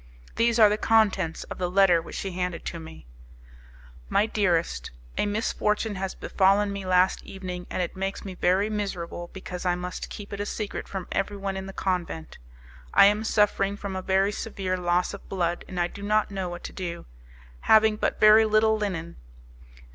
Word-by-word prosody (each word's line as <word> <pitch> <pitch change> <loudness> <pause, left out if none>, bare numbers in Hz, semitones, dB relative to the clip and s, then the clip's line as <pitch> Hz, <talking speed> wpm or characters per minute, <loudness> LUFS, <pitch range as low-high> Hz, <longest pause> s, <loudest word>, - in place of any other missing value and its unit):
These 235 0 +2
are 220 -2 +8
the 210 +1 0
contents 215 -7 +2
of - - -9
the 180 -1 -1
letter 180 -2 +4
which - - -10
she 195 - -3
handed 180 -1 -3
to 170 - -4
me: 160 - -11 1.0
"My 210 - +3
dearest, 170 - 0 0.3
a - - 0
misfortune 210 0 0
has 190 -1 -4
befallen 200 +1 +2
me 200 -1 -5
last 185 0 +3
evening, 180 -2 -7
and 180 - -1
it 175 - -5
makes 195 +1 -4
me 190 - -5
very 185 +3 +2
miserable 180 -5 -4
because 180 -2 -7
I 180 -1 +1
must 180 0 -5
keep 205 -1 -8
it 200 - -5
a 205 - -2
secret 210 -2 -4
from 190 -2 -5
everyone 195 0 -2
in 190 0 -5
the - - -6
convent. 180 -4 -3 0.6
I - - +9
am 210 +2 +3
suffering 205 -2 +2
from 200 -2 -5
a 185 - -3
very 195 +2 +2
severe 195 -3 -3
loss 180 +1 0
of 200 - -10
blood, 175 -2 -1
and 185 - -5
I 175 - +3
do 190 +3 -8
not 210 +1 +1
know 190 -2 -3
what 175 0 -8
to - - -7
do, 175 -3 -5 0.5
having 220 - +5
but - - -1
very 215 +1 +7
little 220 0 +3
linen. 185 -6 -4
195 Hz, 185 wpm, -26 LUFS, 180-205 Hz, 1.0 s, I